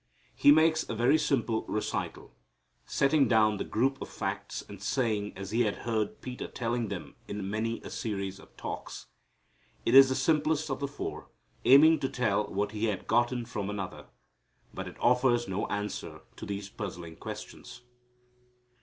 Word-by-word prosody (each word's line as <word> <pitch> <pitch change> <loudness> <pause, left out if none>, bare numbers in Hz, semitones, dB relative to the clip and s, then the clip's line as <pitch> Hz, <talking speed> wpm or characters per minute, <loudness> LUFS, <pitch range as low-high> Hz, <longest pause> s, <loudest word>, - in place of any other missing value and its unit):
He 145 - +6
makes 160 +1 +5
a 115 - -2
very 125 +7 +4
simple 120 -7 0
recital, 105 - -3 0.5
setting 140 +1 +3
down 110 -2 +4
the - - -2
group 135 +5 0
of - - -5
facts - - -4
and - - -10
sayings 110 -6 0
as 95 0 -7
He 115 +2 +2
had 105 -4 +1
heard 110 -3 -1
Peter 125 -1 -6
telling 120 -1 -2
them - - -6
in 100 -1 -4
many 110 +3 -2
a - - -8
series 100 -3 -3
of - - -18
talks. - - -6 0.8
It 115 - +2
is 135 0 +10
the 130 - 0
simplest 155 0 +1
of 135 - -2
the 140 - -1
four, 140 - -6 0.4
aiming 155 +4 +7
to 135 - -1
tell 110 -4 0
what 100 +1 -1
he 110 +1 -1
had 105 -4 -2
gotten 120 +1 +1
from 105 -4 -4
another. 100 -3 -5 0.7
But - - -5
it - - -10
offers 125 -1 +3
no 95 +2 -2
answer 105 0 -4
to - - -8
these 100 0 -4
puzzling 90 -6 -7
questions. - - -8
115 Hz, 165 wpm, -30 LUFS, 105-135 Hz, 0.8 s, is